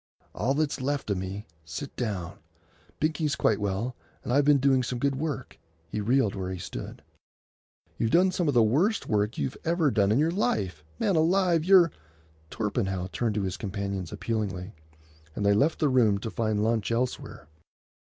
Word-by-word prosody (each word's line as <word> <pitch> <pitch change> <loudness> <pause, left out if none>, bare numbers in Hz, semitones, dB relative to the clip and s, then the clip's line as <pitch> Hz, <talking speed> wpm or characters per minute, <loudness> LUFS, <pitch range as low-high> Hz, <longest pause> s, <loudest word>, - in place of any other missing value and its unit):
"All 130 +6 0
that's 150 -2 -1
left 140 -4 -1
of 95 - 0
me. 95 +3 -5 0.2
Sit 80 - -7
down. 100 -6 -4 0.6
Binkie's 155 -1 0
quite 110 -5 +2
well, 105 +5 -2 0.3
and 120 - -2
I've 140 +1 +4
been 145 -1 +6
doing 135 -1 +3
some 125 0 -3
good 140 +3 +1
work." 140 -2 -4 0.3
He 105 - -3
reeled 120 -1 +2
where 95 -1 -4
he 95 - -4
stood. 90 0 -7 1.0
"You've 115 - +1
done 180 +8 +4
some 180 -2 -1
of 145 - +1
the 120 - +6
worst 165 - +1
work 105 0 0
you've 70 -2 -2
ever 165 -3 +2
done 100 -3 +2
in 110 - +3
your 155 +3 +2
life. 95 - -1
Man 195 - +1
alive, 170 0 +3
you're——" 180 -2 +6 0.6
Torpenhow 95 -4 -2
turned 115 -4 -1
to 105 - 0
his 95 -2 -3
companions 100 -3 -4
appealingly, 105 -4 -3 0.6
and 100 - -2
they 100 - +5
left 145 +10 +2
the 150 - +2
room 120 -7 +3
to 110 - -4
find 110 -2 0
lunch 110 -2 0
elsewhere. 120 - -3
115 Hz, 175 wpm, -27 LUFS, 100-145 Hz, 1.0 s, been